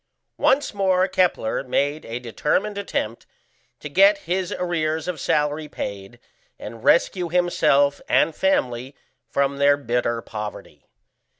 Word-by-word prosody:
Once 280 Hz, -3 st, +2 dB
more 190 Hz, -2 st, +2 dB
Kepler 180 Hz, -14 st, 0 dB
made 145 Hz, +3 st, -1 dB
a 115 Hz, +1 st, -5 dB
determined 150 Hz, -, -1 dB
attempt 120 Hz, -, -4 dB, 0.5 s
to -, -, -7 dB
get 195 Hz, +7 st, +5 dB
his 180 Hz, +1 st, -1 dB
arrears 160 Hz, -3 st, -2 dB
of 180 Hz, -4 st, -3 dB
salary 150 Hz, +2 st, 0 dB
paid, 100 Hz, -7 st, -7 dB, 0.4 s
and 110 Hz, +2 st, -9 dB
rescue 175 Hz, 0 st, +2 dB
himself 150 Hz, -5 st, +2 dB
and 155 Hz, 0 st, +3 dB
family 130 Hz, -8 st, 0 dB, 0.3 s
from 140 Hz, 0 st, 0 dB
their 140 Hz, 0 st, +4 dB
bitter 120 Hz, -3 st, -1 dB
poverty. 105 Hz, -1 st, -8 dB
150 Hz, 120 wpm, -23 LUFS, 125-180 Hz, 0.5 s, get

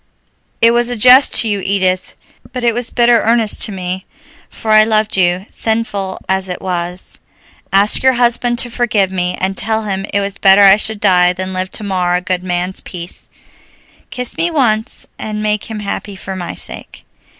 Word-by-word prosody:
"It 230 Hz, 0 st, +6 dB
was 240 Hz, 0 st, +1 dB
a 245 Hz, -, -2 dB
jest 250 Hz, +4 st, +6 dB
to 225 Hz, -, -2 dB
you, 205 Hz, -2 st, -1 dB
Edith, 185 Hz, -1 st, -1 dB, 0.4 s
but 250 Hz, -2 st, -5 dB
it 235 Hz, -1 st, +2 dB
was 245 Hz, +1 st, 0 dB
bitter 240 Hz, -1 st, +3 dB
earnest 225 Hz, -2 st, +1 dB
to -, -, -5 dB
me, 185 Hz, -1 st, -5 dB, 0.4 s
for 220 Hz, -, -5 dB
I 215 Hz, 0 st, +7 dB
loved 215 Hz, 0 st, 0 dB
you, 180 Hz, 0 st, +1 dB
sinful 215 Hz, -4 st, -3 dB
as 190 Hz, 0 st, -1 dB
it 180 Hz, -, -4 dB
was. 180 Hz, 0 st, -4 dB, 0.5 s
Ask 200 Hz, +2 st, +5 dB
your 260 Hz, 0 st, +4 dB
husband 240 Hz, 0 st, +1 dB
to 240 Hz, 0 st, -2 dB
forgive 220 Hz, -6 st, 0 dB
me, 180 Hz, -1 st, -2 dB
and 190 Hz, +1 st, -1 dB
tell 220 Hz, +2 st, -1 dB
him 195 Hz, -1 st, -3 dB
it 200 Hz, -, +1 dB
was 200 Hz, 0 st, -4 dB
better 195 Hz, +1 st, +6 dB
I 195 Hz, 0 st, +7 dB
should 215 Hz, 0 st, -2 dB
die 180 Hz, -2 st, +4 dB
than 185 Hz, +1 st, -5 dB
live 185 Hz, 0 st, -2 dB
to -, -, -4 dB
mar 180 Hz, -3 st, -1 dB
a -, -, +1 dB
good 185 Hz, -1 st, -2 dB
man's 180 Hz, +1 st, -3 dB
peace. 175 Hz, -1 st, -9 dB, 0.8 s
Kiss 250 Hz, -1 st, -4 dB
me 335 Hz, +1 st, +3 dB
once, 240 Hz, -8 st, -1 dB
and 215 Hz, 0 st, -4 dB
make 210 Hz, -1 st, -1 dB
him 220 Hz, -2 st, -6 dB
happy 200 Hz, 0 st, -5 dB
for 190 Hz, 0 st, -7 dB
my 180 Hz, -2 st, -6 dB
sake." -, -, -8 dB
200 Hz, 190 wpm, -15 LUFS, 185-225 Hz, 0.8 s, I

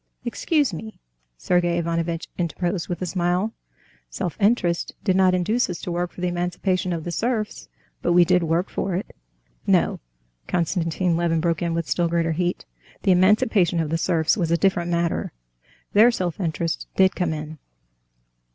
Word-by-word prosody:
"Excuse 285 Hz, -, +1 dB
me," 220 Hz, +7 st, -8 dB, 0.4 s
Sergey 175 Hz, -, +1 dB
Ivanovitch 170 Hz, 0 st, -2 dB
interposed 175 Hz, +1 st, -2 dB
with 175 Hz, +1 st, -3 dB
a -, -, 0 dB
smile, 180 Hz, +4 st, 0 dB, 0.6 s
"self 155 Hz, -, -4 dB
interest 200 Hz, -5 st, +1 dB
did 190 Hz, -, +2 dB
not 185 Hz, -1 st, +4 dB
induce 215 Hz, +7 st, +1 dB
us 175 Hz, -, -4 dB
to 180 Hz, -, -4 dB
work 175 Hz, 0 st, -2 dB
for -, -, -10 dB
the 180 Hz, -, +1 dB
emancipation 180 Hz, +1 st, -1 dB
of 165 Hz, -2 st, -3 dB
the 175 Hz, -, -4 dB
serfs, 220 Hz, +3 st, -2 dB, 0.3 s
but 175 Hz, -, +1 dB
we 175 Hz, 0 st, +6 dB
did 180 Hz, +1 st, +3 dB
work 165 Hz, +2 st, 0 dB
for 190 Hz, -2 st, -2 dB
it." 185 Hz, -, -5 dB, 0.5 s
"No!" -, -, +2 dB, 0.5 s
Konstantin 170 Hz, 0 st, 0 dB
Levin 165 Hz, -1 st, +1 dB
broke 165 Hz, -1 st, 0 dB
in 170 Hz, -1 st, -1 dB
with 170 Hz, -1 st, -2 dB
still 175 Hz, -1 st, +1 dB
greater 165 Hz, -1 st, 0 dB
heat; 175 Hz, +2 st, -1 dB, 0.4 s
"the 190 Hz, -, +4 dB
emancipation 185 Hz, -1 st, +3 dB
of 160 Hz, -2 st, -1 dB
the 165 Hz, -, +1 dB
serfs 165 Hz, -3 st, +2 dB
was 175 Hz, -6 st, -1 dB
a 170 Hz, -, +3 dB
different 175 Hz, -2 st, +1 dB
matter. 170 Hz, -1 st, -1 dB, 0.6 s
There 220 Hz, +4 st, +7 dB
self 180 Hz, -8 st, -2 dB
interest 165 Hz, -2 st, -2 dB
did 190 Hz, 0 st, +4 dB
come 180 Hz, -3 st, 0 dB
in. 155 Hz, 0 st, -6 dB
175 Hz, 170 wpm, -23 LUFS, 170-185 Hz, 0.6 s, There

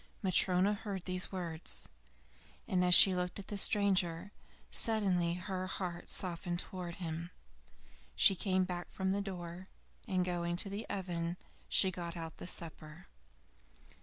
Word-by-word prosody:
Matryona 185 Hz, +1 st, +3 dB
heard 200 Hz, -3 st, -5 dB
these 185 Hz, -1 st, +1 dB
words, 170 Hz, -4 st, -3 dB, 0.8 s
and 185 Hz, -3 st, +1 dB
as 180 Hz, -1 st, +7 dB
she 190 Hz, -, +10 dB
looked 180 Hz, 0 st, -2 dB
at 200 Hz, -, -9 dB
the 210 Hz, -, -4 dB
stranger, 190 Hz, -3 st, +2 dB, 0.4 s
suddenly 185 Hz, -6 st, +3 dB
her 185 Hz, 0 st, -4 dB
heart 180 Hz, -2 st, -4 dB
softened 175 Hz, -1 st, -2 dB
towards 175 Hz, -1 st, -6 dB
him. 170 Hz, -1 st, -4 dB, 0.9 s
She -, -, +6 dB
came 185 Hz, 0 st, +1 dB
back 180 Hz, -1 st, -5 dB
from 190 Hz, 0 st, -2 dB
the 200 Hz, +1 st, 0 dB
door, 180 Hz, -2 st, -7 dB, 0.4 s
and 185 Hz, -1 st, +1 dB
going 175 Hz, -1 st, -1 dB
to 195 Hz, +3 st, -3 dB
the 205 Hz, +3 st, -5 dB
oven 175 Hz, -3 st, -3 dB, 0.3 s
she 190 Hz, -, +4 dB
got 170 Hz, -1 st, -6 dB
out 165 Hz, -1 st, -6 dB
the -, -, -8 dB
supper. 160 Hz, -1 st, -8 dB
180 Hz, 140 wpm, -34 LUFS, 175-190 Hz, 0.9 s, she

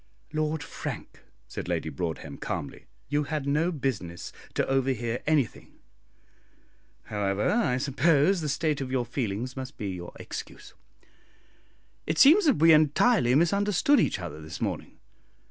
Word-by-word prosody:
"Lord 155 Hz, 0 st, -1 dB
Frank," -, -, -7 dB, 0.3 s
said -, -, -6 dB
Lady 80 Hz, -, -1 dB
Broadhem, 80 Hz, +3 st, -5 dB
calmly, -, -, -5 dB, 0.2 s
"you 145 Hz, 0 st, 0 dB
had 150 Hz, -2 st, -3 dB
no 150 Hz, +5 st, +1 dB
business 125 Hz, -, -4 dB, 0.2 s
to -, -, +1 dB
overhear 130 Hz, -3 st, 0 dB
anything; 145 Hz, -6 st, 0 dB, 1.3 s
however, 100 Hz, -1 st, 0 dB
I 210 Hz, -, +2 dB
suppose 145 Hz, +6 st, +2 dB
the 150 Hz, -, -2 dB
state 150 Hz, -1 st, 0 dB
of 130 Hz, -, -4 dB
your 130 Hz, -2 st, 0 dB
feelings 120 Hz, 0 st, -3 dB
must 130 Hz, +1 st, -7 dB
be 105 Hz, -4 st, -3 dB
your 90 Hz, -2 st, -6 dB
excuse. -, -, -8 dB, 1.3 s
It 155 Hz, -, -1 dB
seems 335 Hz, -, +7 dB
that 285 Hz, -6 st, +5 dB
we 165 Hz, +1 st, +7 dB
entirely 155 Hz, -, +4 dB
misunderstood 200 Hz, -, +3 dB
each -, -, +1 dB
other 80 Hz, -4 st, -7 dB
this 80 Hz, 0 st, -8 dB
morning. -, -, -4 dB
140 Hz, 135 wpm, -27 LUFS, 115-160 Hz, 1.3 s, seems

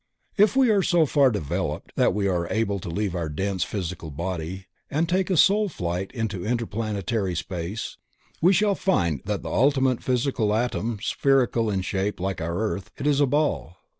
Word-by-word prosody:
If 210 Hz, +4 st, +4 dB
we 260 Hz, -4 st, +5 dB
are 200 Hz, -2 st, +4 dB
so 175 Hz, -3 st, +3 dB
far 140 Hz, -2 st, +4 dB
developed 90 Hz, -, -3 dB
that -, -, +3 dB
we 100 Hz, -1 st, +1 dB
are 85 Hz, -2 st, -1 dB
able 110 Hz, -3 st, 0 dB
to 85 Hz, -, -7 dB
leave 95 Hz, +1 st, -2 dB
our 85 Hz, -3 st, -2 dB
dense 95 Hz, +4 st, -1 dB
physical 90 Hz, -5 st, -5 dB
body 85 Hz, +3 st, -4 dB, 0.2 s
and 155 Hz, +4 st, 0 dB
take 185 Hz, +2 st, +1 dB
a 185 Hz, -, +2 dB
soul 205 Hz, +5 st, +4 dB
flight 90 Hz, -, -3 dB
into 110 Hz, -7 st, -3 dB
interplanetary 110 Hz, -4 st, -2 dB
space 90 Hz, +4 st, -4 dB, 0.4 s
we 175 Hz, +3 st, +6 dB
shall 200 Hz, +2 st, +3 dB
find 85 Hz, -, 0 dB
that -, -, -2 dB
the -, -, -5 dB
ultimate 130 Hz, -1 st, +2 dB
physical 125 Hz, -4 st, 0 dB
atom 115 Hz, -1 st, -1 dB
is 115 Hz, -, -7 dB
spherical 125 Hz, -6 st, +2 dB
in 95 Hz, -2 st, 0 dB
shape 95 Hz, +2 st, -2 dB
like 95 Hz, -1 st, -2 dB
our 85 Hz, +2 st, -2 dB
earth; 105 Hz, -2 st, -2 dB
it 140 Hz, -, -5 dB
is 145 Hz, -1 st, +3 dB
a 145 Hz, -, +4 dB
ball. 145 Hz, -, 0 dB
105 Hz, 185 wpm, -25 LUFS, 90-140 Hz, 0.4 s, we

